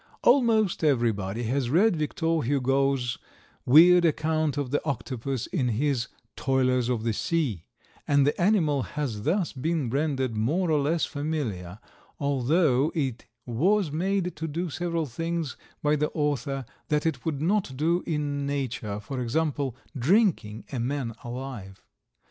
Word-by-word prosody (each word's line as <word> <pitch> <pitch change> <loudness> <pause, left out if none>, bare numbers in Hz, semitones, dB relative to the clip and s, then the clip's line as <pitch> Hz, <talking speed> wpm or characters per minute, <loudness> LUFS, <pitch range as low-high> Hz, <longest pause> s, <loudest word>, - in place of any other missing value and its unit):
Almost 225 -9 +3
everybody 115 -6 +1
has 125 +2 0
read 180 - +4
Victor 160 +1 0
Hugo's 135 -1 +1 0.5
weird 175 +6 +8
account 155 -2 +1
of 140 -3 -2
the 145 - 0
octopus 130 -2 -3
in 140 -9 -1
his 125 +1 0 0.3
"Toilers 130 -2 +1
of 120 -3 -1
the 115 -1 0
Sea," 125 - -1 0.4
and 140 -1 +4
the 145 - 0
animal 170 -8 +3
has 125 -7 -4
thus 170 - 0
been 145 -2 -1
rendered 135 -4 0
more 160 - +1
or 150 - +3
less 155 +4 +1
familiar, 135 - -4 0.4
although 140 +1 +2
it 135 -7 -2 0.2
was 170 - +1
made 180 +3 -1
to 160 +1 -3
do 165 +2 -3
several 170 0 -1
things 165 +3 -3 0.3
by 150 0 +3
the 150 0 0
author 145 -3 -1 0.2
that 150 0 0
it 150 -7 -1
would 155 -4 -2
not 175 -4 0
do 170 +5 +2
in 145 -3 -1
nature, 130 -7 -3
as, 105 +1 -6
for 130 +4 -5
example, 140 0 -1 0.2
"drinking" 140 - +2
a 130 - -3
man 125 -1 -2
alive. 120 -6 -7
145 Hz, 145 wpm, -27 LUFS, 125-160 Hz, 0.5 s, weird